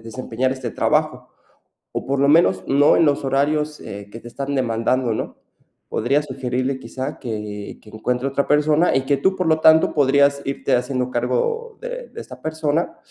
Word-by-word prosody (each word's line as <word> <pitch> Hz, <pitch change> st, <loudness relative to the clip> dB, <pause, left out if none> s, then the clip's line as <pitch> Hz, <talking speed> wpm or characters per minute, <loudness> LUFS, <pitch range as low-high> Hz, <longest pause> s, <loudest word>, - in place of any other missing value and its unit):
desempeñar 125 Hz, +2 st, -3 dB
este 130 Hz, -3 st, -5 dB
trabajo, -, -, 0 dB, 0.6 s
o -, -, -4 dB
por 135 Hz, 0 st, 0 dB
lo 140 Hz, -, +3 dB
menos 95 Hz, -, +4 dB
no 145 Hz, +2 st, +5 dB
en 165 Hz, -, +4 dB
los 145 Hz, -1 st, +1 dB
horarios, 150 Hz, +3 st, 0 dB
eh, 100 Hz, 0 st, -8 dB
que 115 Hz, -, -9 dB
te 120 Hz, -, -10 dB
están 140 Hz, +3 st, -4 dB
demandando, 120 Hz, 0 st, 0 dB
¿no? -, -, -5 dB, 0.5 s
Podrías 140 Hz, +6 st, 0 dB
sugerirle, 130 Hz, 0 st, -2 dB
quizá, 135 Hz, +3 st, -6 dB
que 105 Hz, -4 st, -6 dB
que 105 Hz, -, -15 dB
encuentre 125 Hz, +4 st, -2 dB
otra 140 Hz, +1 st, -1 dB
persona 150 Hz, +3 st, +3 dB
y 135 Hz, -, +1 dB
que 140 Hz, 0 st, +2 dB
tú, 190 Hz, +6 st, +2 dB
por 185 Hz, -, -1 dB
lo 160 Hz, 0 st, +3 dB
tanto, 160 Hz, 0 st, +5 dB
podrías 140 Hz, 0 st, +3 dB
irte 140 Hz, -, 0 dB
haciendo 125 Hz, 0 st, -2 dB
cargo 455 Hz, -, -1 dB
de -, -, -6 dB
de -, -, -9 dB
esta -, -, -11 dB
persona, 160 Hz, +1 st, -1 dB
135 Hz, 180 wpm, -21 LUFS, 125-150 Hz, 0.6 s, no